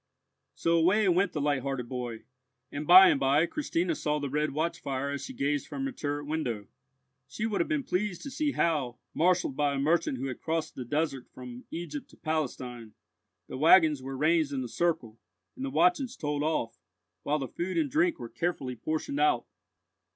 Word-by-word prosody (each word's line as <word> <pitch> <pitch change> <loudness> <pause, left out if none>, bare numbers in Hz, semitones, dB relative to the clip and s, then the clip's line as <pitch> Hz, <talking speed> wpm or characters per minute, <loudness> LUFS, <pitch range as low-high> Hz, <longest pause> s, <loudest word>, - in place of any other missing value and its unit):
So 170 0 +2
away 195 +5 +4
went 180 +2 +3
the 150 - -3
light 145 -2 +1
hearted 135 -2 -3
boy, 120 -3 -5 0.5
and 145 +1 -5
by 185 +2 +10
and - - +2
by 140 +4 +3
Christina 175 - -1
saw 150 -1 -1
the 140 -2 -4
red 150 +1 +1
watch 160 +4 -1
fire 140 0 -3
as 140 - -4
she 265 - -6
gazed 145 - -1
from 270 - -4
her 275 - -2
turret 145 - -3
window. 130 -9 -2 0.6
She 215 - -4
would 215 -3 0
have - - 0
been 290 -4 0
pleased 190 -4 -2
to 280 - -6
see 295 +1 -1
how, 145 -8 0 0.2
marshalled 175 -4 +2
by 145 -1 +1
a - - -1
merchant 150 -2 +1
who 130 - -4
had 130 -3 -5
crossed 160 -1 -2
the 125 - -6
desert 140 0 -1
from 125 -1 -10
Egypt 160 -3 -6
to - - -18
Palestine, 125 -7 -3 0.5
the - - -6
waggons 155 -2 +6
were 135 +1 -6
ranged 155 0 +2
in 135 -2 -2
a - - -4
circle, 125 -6 -1 0.4
and 260 - -6
the 275 - -2
watches 275 -5 +2
told 145 -1 -2
off, 150 -7 -1 0.4
while 150 - 0
the 135 -3 -3
food 175 +9 -4
and 305 -5 +1
drink 325 +3 +2
were 120 - -7
carefully 140 -3 -3
portioned 155 - -3
out. 370 -1 +3
150 Hz, 195 wpm, -29 LUFS, 135-180 Hz, 0.6 s, by